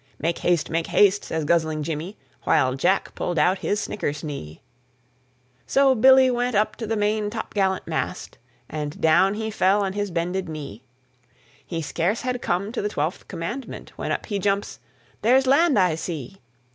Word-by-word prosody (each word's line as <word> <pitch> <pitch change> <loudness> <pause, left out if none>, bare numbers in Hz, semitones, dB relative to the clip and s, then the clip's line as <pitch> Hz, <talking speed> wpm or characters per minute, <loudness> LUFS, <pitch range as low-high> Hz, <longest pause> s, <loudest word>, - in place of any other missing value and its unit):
"Make 165 +3 -1
haste, 175 -3 +1
make 165 0 -1
haste," 205 0 +4
says 160 -2 -2
guzzling 160 -1 +1
Jimmy 165 +6 -5 0.3
While 130 0 +3
Jack 180 +9 +1
pulled 175 - -3
out 180 +5 +3
his 205 - -1
snickersnee. 145 - -5 1.1
So 270 -1 +4
Billy 260 +2 +6
went 245 -1 -1
up 210 +1 +1
to 225 - -5
the 225 - 0
main 210 0 0
topgallant 200 -4 -1
mast, 165 +2 -4 0.3
And 150 -1 -5
down 175 +5 +4
he 220 0 -3
fell 200 0 +2
on 190 -1 -2
his 205 0 -2
bended 180 +1 -2
knee. 140 -9 -7 0.8
He 165 -2 -4
scarce 180 +8 -1
had 250 -1 -2
come 190 +4 -1
to 240 - -3
the 210 - -1
Twelfth 160 -1 -3
Commandment 235 +11 -6
When - - -4
up - - -2
he 205 -3 -2
jumps, 200 +1 -1 0.4
"There's 260 +4 +4
land 285 +2 +4
I 180 -4 +4
see. 160 0 -5
190 Hz, 165 wpm, -24 LUFS, 160-215 Hz, 1.1 s, Billy